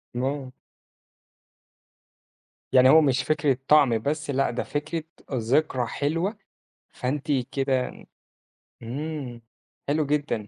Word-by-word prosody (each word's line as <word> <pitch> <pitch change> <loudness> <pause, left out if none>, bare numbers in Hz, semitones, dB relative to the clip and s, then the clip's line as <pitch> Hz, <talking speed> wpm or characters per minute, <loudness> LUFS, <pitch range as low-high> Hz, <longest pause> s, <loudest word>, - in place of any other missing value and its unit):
آه. 130 +1 -2 2.2
يعني 130 0 +7
هو 160 +3 +8
مش 135 -2 +2
فكرة 145 -4 +1
طَعَم 140 -6 +5
بس، 150 +5 -3
لأ 135 0 +1
ده 120 - -2
فكرة 155 +2 -3 0.3
ذكرى 130 +2 +1
حلوة، 165 - -1 0.6
فأنتِ 140 +3 -2 0.2
كده 135 -2 0 0.9
إمم، 135 -1 -5 0.5
حلو 150 +1 +1
جدًا، 145 -7 -1
140 Hz, 95 wpm, -25 LUFS, 130-150 Hz, 2.2 s, هو